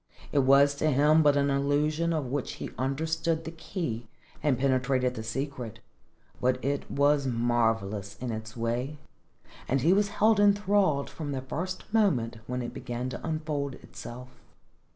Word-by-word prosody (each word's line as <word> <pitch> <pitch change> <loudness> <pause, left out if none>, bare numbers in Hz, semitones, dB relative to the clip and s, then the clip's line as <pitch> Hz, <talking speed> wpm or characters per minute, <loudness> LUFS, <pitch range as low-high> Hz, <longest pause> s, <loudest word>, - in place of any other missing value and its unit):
It 145 - +3
was 140 +1 +5
to 155 - +2
him 150 +3 +5
an 145 -1 +4
illusion 150 +4 +1
of 155 -4 -1
which 130 +1 -3
he - - -6
understood 160 +5 -1
the 165 - -6
key 160 - -4 0.3
and 145 -4 +2
penetrated 130 -1 +1
the 110 - -5
secret, 125 0 -4 0.6
but 125 +1 +2
it 140 0 -1
was 140 0 +2
marvellous 115 -4 0
in 125 +1 -4
its 110 +1 -6
way, 120 +6 -2 0.7
and 135 +1 +1
he 170 +7 +5
was 205 +1 +3
held 210 +1 +3
enthralled 200 -7 +3
from 145 -3 -5
the 130 - -2
first 180 +7 -4
moment 135 - +2
when 125 0 -2
it 120 - -5
began 120 +1 -4
to - - -7
unfold 155 -4 -2
itself. 125 +2 -10
140 Hz, 150 wpm, -28 LUFS, 125-155 Hz, 0.7 s, was